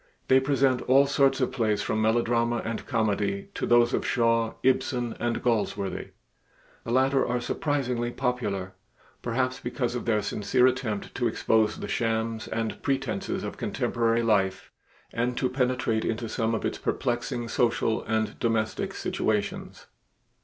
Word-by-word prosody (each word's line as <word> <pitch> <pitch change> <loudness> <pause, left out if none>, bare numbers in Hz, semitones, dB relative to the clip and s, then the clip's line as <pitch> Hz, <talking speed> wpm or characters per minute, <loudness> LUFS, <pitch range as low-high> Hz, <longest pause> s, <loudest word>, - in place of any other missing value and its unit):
They 130 - +7
present 135 -2 +2
all 135 +2 +6
sorts 135 -1 +2
of 130 - +1
plays 105 -4 0
from 110 +1 -1
melodrama 115 +1 +1
and 115 -1 -4
comedy 105 -5 0
to - - -3
those 120 +1 +4
of - - +1
Shaw, 115 -2 +1
Ibsen, 125 -2 +1
and 120 0 -1
Galsworthy. 105 -4 -1 0.8
The - - -7
latter 130 +2 +3
are 125 0 0
surprisingly 125 -2 -1
popular, 115 -7 -2 0.5
perhaps 130 +2 -1
because 120 -1 -2
of 125 - -4
their 110 -3 +1
sincere 125 +5 +2
attempt 125 -5 -1
to 120 - 0
expose 110 -1 +1
the - - -5
shams 115 -1 -1
and 110 0 -3
pretenses 135 -2 -2
of - - -5
contemporary 115 0 0
life 95 -4 +1 0.4
and 120 +1 -1
to 130 - +1
penetrate 125 -3 0
into 115 +1 -2
some 115 0 0
of - - -3
its - - -2
perplexing 120 -1 -2
social 115 -1 +1
and 110 0 -1
domestic 115 -2 -1
situations. 105 -2 -2
115 Hz, 145 wpm, -27 LUFS, 110-125 Hz, 0.8 s, They